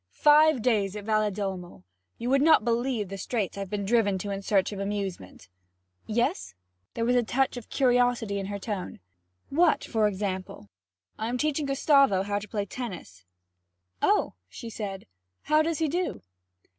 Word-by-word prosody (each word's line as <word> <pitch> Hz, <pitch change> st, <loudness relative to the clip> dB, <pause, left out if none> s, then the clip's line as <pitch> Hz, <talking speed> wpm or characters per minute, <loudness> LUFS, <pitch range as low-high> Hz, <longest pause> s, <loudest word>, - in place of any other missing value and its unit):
'Five 300 Hz, -, +5 dB
days 210 Hz, -5 st, +1 dB
at 210 Hz, -, -6 dB
Valedolmo! 200 Hz, -, -2 dB, 0.3 s
You 240 Hz, +2 st, -3 dB
would 275 Hz, 0 st, +4 dB
not 310 Hz, -7 st, +5 dB
believe 235 Hz, -2 st, 0 dB
the 195 Hz, 0 st, -6 dB
straits 215 Hz, -3 st, -2 dB
I've 195 Hz, -1 st, -5 dB
been 200 Hz, 0 st, -3 dB
driven 205 Hz, -3 st, +2 dB
to 200 Hz, +2 st, -4 dB
in 195 Hz, 0 st, -3 dB
search 195 Hz, -1 st, +1 dB
of 200 Hz, -, -6 dB
amusement.' 195 Hz, -, -5 dB, 0.6 s
'Yes?' 155 Hz, -, -1 dB, 0.4 s
There 230 Hz, -, -1 dB
was 245 Hz, +1 st, +2 dB
a 245 Hz, -, +5 dB
touch 260 Hz, +4 st, 0 dB
of 245 Hz, -3 st, -9 dB
curiosity 245 Hz, -5 st, +2 dB
in 195 Hz, -, -4 dB
her 200 Hz, 0 st, -4 dB
tone. 200 Hz, -, -5 dB, 0.5 s
'What 330 Hz, +3 st, +3 dB
for 220 Hz, -2 st, +1 dB
example?' 190 Hz, -, -4 dB, 0.5 s
'I 220 Hz, -, -2 dB
am 250 Hz, -, -1 dB
teaching 300 Hz, +1 st, 0 dB
Gustavo 275 Hz, -7 st, +4 dB
how 205 Hz, 0 st, -1 dB
to 210 Hz, -, -9 dB
play 205 Hz, -2 st, -2 dB
tennis.' 180 Hz, -, -8 dB, 0.8 s
'Oh!' -, -, +2 dB, 0.2 s
she 230 Hz, -, -8 dB
said. 200 Hz, -3 st, -6 dB, 0.4 s
'How 305 Hz, +1 st, +3 dB
does 325 Hz, 0 st, -1 dB
he 320 Hz, -, +1 dB
do?' 350 Hz, +4 st, -2 dB
215 Hz, 165 wpm, -27 LUFS, 195-250 Hz, 0.8 s, Five